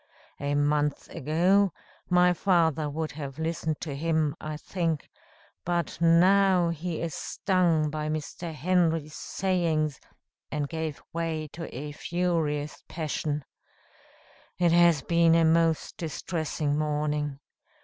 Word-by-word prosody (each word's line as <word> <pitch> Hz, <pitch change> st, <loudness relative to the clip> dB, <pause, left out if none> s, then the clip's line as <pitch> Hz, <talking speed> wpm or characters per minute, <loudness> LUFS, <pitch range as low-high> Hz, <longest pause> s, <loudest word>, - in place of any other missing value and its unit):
A 145 Hz, +1 st, -1 dB
month 145 Hz, 0 st, +1 dB
ago, 180 Hz, +7 st, +2 dB, 0.4 s
my 180 Hz, 0 st, +5 dB
father 165 Hz, -5 st, +2 dB
would 155 Hz, 0 st, -3 dB
have 140 Hz, -1 st, -7 dB
listened 160 Hz, -1 st, -2 dB
to 150 Hz, -, -4 dB
him, 155 Hz, 0 st, 0 dB
I 155 Hz, 0 st, -4 dB
think; 165 Hz, -2 st, -2 dB, 0.6 s
but 170 Hz, -1 st, -2 dB
now, 180 Hz, +1 st, +5 dB
he 170 Hz, 0 st, -3 dB
is 165 Hz, -3 st, -3 dB
stung 170 Hz, -6 st, +1 dB
by 155 Hz, 0 st, -3 dB
Mr. 155 Hz, +2 st, -4 dB
Henry's 160 Hz, -1 st, +1 dB
sayings, 165 Hz, -7 st, -1 dB, 0.5 s
and 150 Hz, -1 st, -1 dB
gave 160 Hz, -1 st, -4 dB
way 160 Hz, -2 st, -2 dB
to 165 Hz, -1 st, -6 dB
a 145 Hz, +4 st, -6 dB
furious 155 Hz, -3 st, -1 dB
passion. 150 Hz, -2 st, -3 dB, 1.1 s
It 175 Hz, -2 st, +3 dB
has 170 Hz, -4 st, +5 dB
been 170 Hz, -1 st, +4 dB
a 165 Hz, -1 st, +4 dB
most 165 Hz, 0 st, +2 dB
distressing 155 Hz, -2 st, -2 dB
morning. 150 Hz, -1 st, -1 dB
160 Hz, 120 wpm, -27 LUFS, 150-170 Hz, 1.1 s, my